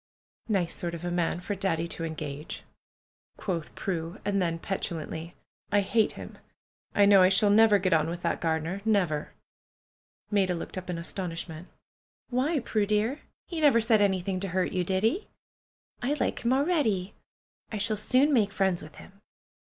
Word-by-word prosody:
"Nice 190 -5 +1
sort 170 -1 -3
of 170 +1 -7
a 175 - -2
man 175 -1 0
for 205 - -3
Daddy 175 -4 -1
to 165 - -4
engage," 155 -2 -5 0.7
quoth 170 -5 -4
Prue; 170 0 -3
and 200 -1 +1
then 165 -2 0
petulantly. 165 -2 -4 0.4
"I 205 0 +4
hate 215 +2 +2
him! - - -10 0.6
I 205 - +6
know 200 -1 +7
I 185 - +6
shall 200 +2 +4
never 215 0 +6
get 185 -2 +1
on 160 0 +3
with 170 +1 -5
that 170 - -1
gardener. 165 +4 -1
Never 180 -9 +1 0.5
!" - - -48
Maida 190 -3 +2
looked 165 - -6
up 185 -1 -6
in 175 - -2
astonishment. 170 -1 -5 0.6
"Why, 280 +6 +1
Prue 215 -3 0
dear, 215 +7 +1 0.3
he 335 -3 -4
never 280 -6 +6
said 225 -2 +4
anything 190 -1 +1
to 195 - -2
hurt 185 0 0
you, 180 -1 0
did 190 +2 0
he? 300 - +1 0.7
I 265 +4 0
like 295 - -2
him 235 - +2
already. 260 - +1 0.6
I 215 - -3
shall 215 +2 0
soon 255 +7 +3
make 210 -6 +3
friends 190 -3 +1
with 155 -1 -12
him." 200 +1 -15
190 Hz, 175 wpm, -28 LUFS, 170-215 Hz, 0.7 s, know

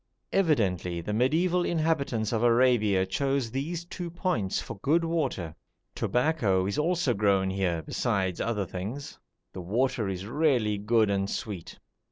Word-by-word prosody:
Evidently 95 - +1
the 85 - -4
mediæval 165 +11 +2
inhabitants 150 -10 0
of 110 - +1
Arabia 115 -5 +3
chose 135 +4 -1
these 165 +7 -3
two 175 0 -6
points 165 - -1
for - - -7
good 165 +4 +2
water. 135 - -2 0.4
Tobacco 125 - +1
is 100 +8 -1
also 170 -4 +1
grown 100 -2 +2
here, 90 -4 -1
besides 95 -3 -1
other 105 -4 -1
things. 105 +11 -6 0.3
The 95 - -6
water 110 +3 0
is 95 0 -4
really 120 -5 +1
good 110 0 +2
and 100 0 0
sweet. 100 -9 -5
115 Hz, 140 wpm, -28 LUFS, 95-150 Hz, 0.4 s, Arabia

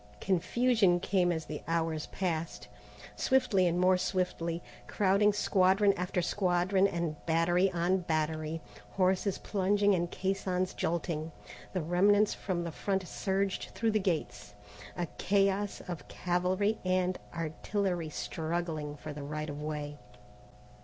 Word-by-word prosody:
Confusion 195 0 +2
came 180 -1 +2
as 160 -2 -2
the 150 - -6
hours 165 -2 -1
passed. 165 - -3 0.5
Swiftly 205 -8 +3
and 175 +1 +1
more 185 0 +4
swiftly, 175 -3 -1 0.2
crowding 205 +1 +3
squadron 195 0 +3
after 180 0 -1
squadron 185 +1 +2
and 170 -5 -3
battery 175 +3 +3
on 180 +2 +1
battery, 155 -1 -2 0.3
horses 190 +1 +1
plunging 205 +1 +2
and 175 -2 0
caissons 185 -1 -1
jolting, 160 -1 -2 0.4
the 185 -4 -1
remnants 200 +5 +4
from 180 -3 -3
the 170 - -4
front 190 +3 -2
surged 195 +1 -1
through 225 -1 +1
the 215 - +2
gates, 105 - -3 0.4
a 175 - 0
chaos 200 0 +1
of 175 -4 -6
cavalry 185 +4 0
and 185 0 +1 0.2
artillery 170 +1 -2
struggling 160 -1 -3
for 150 +1 -7
the 145 - -7
right 150 +1 -4
of 145 +1 -7
way. 150 -1 -4
180 Hz, 125 wpm, -31 LUFS, 165-195 Hz, 0.5 s, more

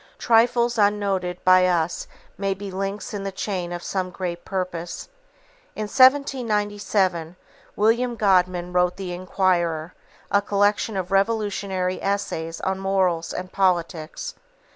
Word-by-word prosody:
Trifles 235 0 +3
unnoted 200 -3 +1
by 185 0 +6
us 170 -2 0 0.3
may 195 0 -1
be 200 0 -7
links 195 +4 -4
in 205 - -3
the 195 0 -4
chain 185 -2 -3
of 175 0 -5
some 185 -2 -2
great 175 -1 -5
purpose. 180 - -4 0.7
In 215 - -3
1797, 210 - +2 0.4
William 235 +3 +2
Godwin 180 -4 +2
wrote 180 0 +2
The 185 -2 -5
Inquirer, 175 -3 0 0.4
a 200 - +4
collection 205 +1 +1
of 185 0 -3
revolutionary 195 -3 0
essays 170 -5 -2
on 190 0 -1
morals 185 -4 0
and 185 0 -5
politics. 180 - -1
190 Hz, 120 wpm, -23 LUFS, 180-205 Hz, 0.7 s, by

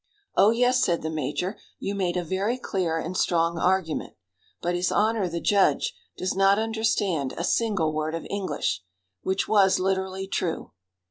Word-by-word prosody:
"Oh, 205 - +6
yes," 245 +2 +3
said 170 -2 +1
the 160 - -2
major, 155 - -2 0.2
"you 200 - -3
made 185 -3 -1
a 180 - 0
very 195 +8 -1
clear 180 -9 -1
and 170 +3 -4
strong 170 -2 +1
argument; 180 -3 0 0.4
but 175 - -1
his 175 +1 0
honor, 215 -3 +2
the 170 0 -3
judge, 200 +2 +2 0.2
does 185 - -1
not 195 +1 +4
understand 215 -10 0
a 170 - -2
single 190 -8 +1
word 155 +1 -2
of 165 - -5
English," 195 - -2 0.4
which 190 0 -1
was 195 -3 +4
literally 190 0 -1
true. 180 -3 -3
190 Hz, 160 wpm, -26 LUFS, 170-200 Hz, 0.4 s, Oh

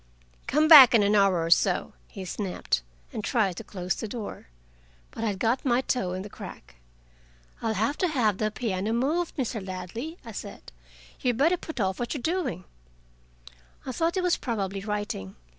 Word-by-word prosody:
"Come 305 +3 +3
back 275 -7 +11
in 215 - +5
an 200 +1 +2
hour 195 -5 +4
or 165 - -2
so," - - +3
he 190 - -8
snapped, 185 - -2 0.3
and 215 - -4
tried 200 -6 +1
to - - -6
close 185 -2 -3
the 220 - -5
door. 215 - -7 0.6
But 225 - -6
I - - +1
had 200 -2 -2
got 230 +6 0
my 250 -1 +2
toe 195 -9 -1
in 185 +1 -4
the - - -7
crack. - - -11 0.8
"I'll 225 -1 -1
have 285 +6 0
to 365 - +2
have 230 - +1
the 215 - +1
piano 215 -2 -2
moved, 305 +9 0
Mr. 235 -6 -2
Ladley," 190 - -6
I 230 - -7
said. 205 - -9 0.5
"You'd 245 -2 0
better 320 +7 +4
put 320 -5 -8
off 190 -2 0
what 240 +4 -2
you - - -3
are - - -12
doing." 315 - -1 1.2
I 260 - -3
thought 330 +7 0
he 375 - +1
was 360 -1 +2
probably 200 -5 -3
writing. 205 - -4
220 Hz, 190 wpm, -27 LUFS, 195-265 Hz, 1.2 s, back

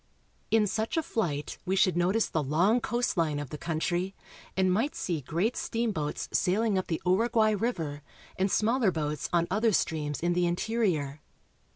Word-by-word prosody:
In 220 -1 +4
such 220 - -2
a 325 - +2
flight 150 - -2
we 190 - 0
should 190 -3 +3
notice 185 +6 +2
the 160 - -1
long 170 - +3
coast 240 -2 -1
line 155 -3 +1
of 145 -3 -5
the 150 - -5
country, 175 +4 -1 0.4
and 185 -1 +3
might 230 +10 0
see 170 -5 -2
great 175 - -1
steamboats 215 -11 -2
sailing 210 +3 +2
up 185 - -1
the 165 - -1
Uruguay 220 +4 +3
river, 170 -10 -2 0.3
and 190 +1 +1
smaller 225 +2 +2
boats 150 -4 -2
on 170 -1 +3
other 220 +3 +3
streams 150 -6 -1
in 175 +1 +1
the 175 0 +2
interior. 175 -7 -1
185 Hz, 170 wpm, -29 LUFS, 160-220 Hz, 0.4 s, In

